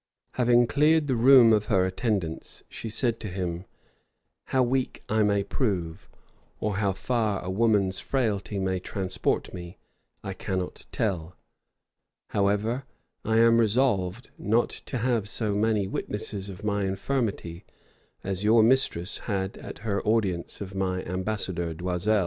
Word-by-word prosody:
Having 120 -1 +4
cleared 150 +4 +3
the 135 -3 0
room 120 -1 +7
of 105 -1 +2
her 95 -3 +3
attendants, 95 -4 -2
she 115 - -7
said 115 +1 0
to - - -5
him, 90 -1 -4 0.8
"How 130 -1 +2
weak 130 +1 -1
I 110 0 +2
may 100 -1 +2
prove, 95 - -2 0.5
or 105 -2 -1
how 100 -2 +1
far 110 -1 0
a 90 - -3
woman's 100 -2 +2
frailty 105 -6 -1
may 95 -1 0
transport 95 0 -2
me, 85 0 -8 0.5
I 95 - -4
cannot 95 -1 -4
tell: 90 -6 -2 0.9
however, 105 +6 0 0.4
I 110 0 +1
am 115 0 +6
resolved 110 -3 +1
not 115 +3 +2 0.2
to - - -3
have 115 -3 0
so 105 -1 -1
many 105 -1 +1
witnesses 105 0 -4
of 95 +1 -9
my 105 -1 0
infirmity 95 -4 -2 0.6
as 95 0 -3
your 110 +1 +5
mistress 110 -7 +2
had 95 -1 -1
at - - -9
her 100 -2 0
audience 100 -7 0
of 95 -1 -6
my 95 -1 -1
ambassador 90 -3 -2
D'Oisel. 90 +5 +1
105 Hz, 140 wpm, -27 LUFS, 95-115 Hz, 0.9 s, room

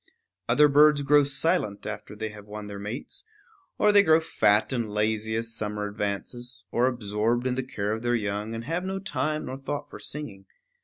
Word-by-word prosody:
Other 150 +5 +6
birds 145 0 +5
grow 145 +1 +5
silent 140 - 0
after 105 0 -6
they 110 +1 -4
have 105 -1 -12
won 105 0 -7
their 100 -1 -7
mates, 120 - -7 0.5
or 210 - +4
they 205 -1 +7
grow 160 -4 +5
fat 110 -7 +2
and 120 -4 -1
lazy 110 +1 0
as 115 0 -1
summer 105 -1 -2
advances, 115 +4 -4
or 120 +2 +3
absorbed 115 0 0
in 130 - +1
the 130 - -1
care 105 -5 -3
of 110 +1 -2
their 120 0 +1
young, 105 0 -2
and 115 - -5
have 165 +7 -2
no 190 +1 -3
time 155 -5 -2
nor 130 - -5
thought 145 +1 -5
for - - -9
singing. 105 -11 -6
115 Hz, 195 wpm, -26 LUFS, 105-145 Hz, 0.5 s, they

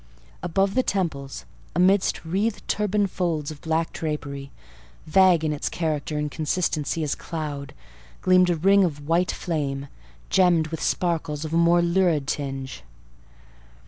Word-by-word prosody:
Above 195 +3 +1
the 255 - +3
temples, 160 - -3 0.3
amidst 185 0 +3
wreathed 200 +6 -1
turban 210 0 +1
folds 170 -6 -2
of 150 - -11
black 160 0 -1
drapery, 140 -3 -4 0.6
vague 175 0 +4
in 155 - 0
its 145 - -2
character 155 -2 -2
and 150 0 -2
consistency 160 -1 -1
as 150 - 0
cloud, 150 -4 -5 0.5
gleamed 185 -1 +5
a 175 - +2
ring 195 +5 +4
of 145 -5 -2
white 170 +2 +2
flame, 140 -4 -3 0.4
gemmed 175 -4 +4
with 160 -1 -5
sparkles 160 -4 -1
of 155 - -5
a - - +2
more 170 +1 +4
lurid 170 -4 +2
tinge. 135 -2 -4
165 Hz, 140 wpm, -24 LUFS, 150-180 Hz, 0.6 s, gleamed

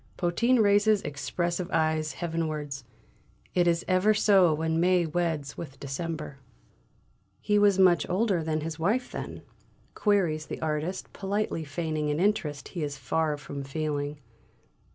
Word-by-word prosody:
Potin 230 +8 +2
raises 205 0 +4
expressive 170 +5 -2
eyes 155 -1 +1
heavenwards. 155 -5 -3 0.7
"It 175 -1 +3
is 170 0 +1
ever 190 +3 +3
so 195 -5 +5
when 160 +1 0
May 180 0 +3
weds 160 -4 -2
with 140 -5 -8
December." 150 0 -5 1.0
"He 210 0 +2
was 205 -2 +4
much 180 -5 +4
older 190 -3 +1
than 155 -1 -1
his 160 +1 -5
wife, 220 +10 0
then?" - - -6 0.5
queries 175 -7 +1
the - - -5
artist, 160 +4 -3
politely 200 -4 -2
feigning 155 0 -2
an 150 +1 0
interest 170 -8 0
he 175 - -5
is 145 -1 -3
far 150 +3 0
from 140 0 -7
feeling. 145 0 -3
165 Hz, 135 wpm, -28 LUFS, 150-185 Hz, 1.0 s, so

